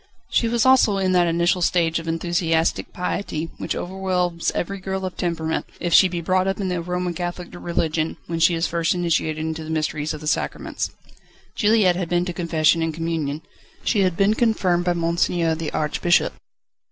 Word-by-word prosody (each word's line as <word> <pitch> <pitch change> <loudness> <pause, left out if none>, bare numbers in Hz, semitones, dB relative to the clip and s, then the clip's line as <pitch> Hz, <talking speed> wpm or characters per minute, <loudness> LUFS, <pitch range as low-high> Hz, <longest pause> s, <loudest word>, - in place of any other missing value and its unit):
She 230 - +2
was 235 0 +1
also 255 -6 +5
in 190 -1 +1
that 175 -1 +4
initial 170 +2 +1
stage 170 -2 +2
of 165 - -9
enthusiastic 165 0 0
piety 170 -3 -3
which - - -2
overwhelms 180 -2 -1
every 195 +3 -2
girl 190 0 -3
of 185 - -5
temperament, 160 -2 -2
if 175 -1 -1
she 190 - +8
be 175 -1 -4
brought 185 +2 +1
up 195 +1 -1
in 195 -2 -1
the 180 -1 -1
Roman 180 +1 -2
Catholic 175 0 -5
religion, 165 -2 -2
when 165 -1 -3
she 170 +1 +4
is 165 +1 0
first 170 +1 0
initiated 160 -3 0
into 160 0 -4
the 155 - -8
mysteries 155 -1 -1
of 155 - -9
the - - -8
Sacraments. 150 - -2 0.6
Juliette 210 -5 +3
had 180 -3 -3
been 175 0 +1
to 180 - -3
confession 165 -1 +2
and 165 0 0
communion. 160 -2 -2 0.4
She 215 - +1
had 185 -3 +2
been 200 +1 +4
confirmed 195 -7 +1
by 175 - +2
Monseigneur, 170 0 +1
the 160 -1 -3
Archbishop. 165 +3 +1
175 Hz, 185 wpm, -22 LUFS, 165-185 Hz, 0.6 s, she